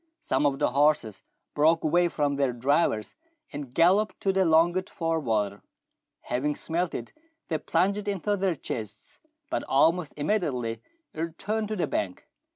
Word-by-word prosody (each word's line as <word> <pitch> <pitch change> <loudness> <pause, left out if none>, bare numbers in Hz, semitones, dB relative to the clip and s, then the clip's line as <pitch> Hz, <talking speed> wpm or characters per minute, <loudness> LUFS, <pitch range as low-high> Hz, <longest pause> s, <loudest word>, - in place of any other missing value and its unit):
Some 145 - +1
of 135 -1 -1
the - - +1
horses 140 -8 +2 0.3
broke 160 +3 +3
away 175 +3 +3
from 145 -4 0
their 135 -3 +1
drivers, 125 -2 +1 0.4
and 140 -3 -6
galloped 190 +9 +3
to 195 - +1
the 190 -1 +3
longed 175 +3 +3
for 165 -1 -1
water. 105 -7 -1 0.6
Having 140 +4 -1
smelt 170 +2 -2
it, 115 - -6 0.4
they 160 -2 0
plunged 200 +6 0
in 200 -2 -1
to 205 +3 +1
their 190 -3 0
chests, 110 -6 -7 0.3
but - - -1
almost 160 +4 +2
imme 155 +9 +1
diately 120 - -3 0.3
returned 190 +7 -3
to 215 - -3
the 180 - 0
bank. 95 -3 -3
155 Hz, 160 wpm, -27 LUFS, 130-180 Hz, 0.6 s, broke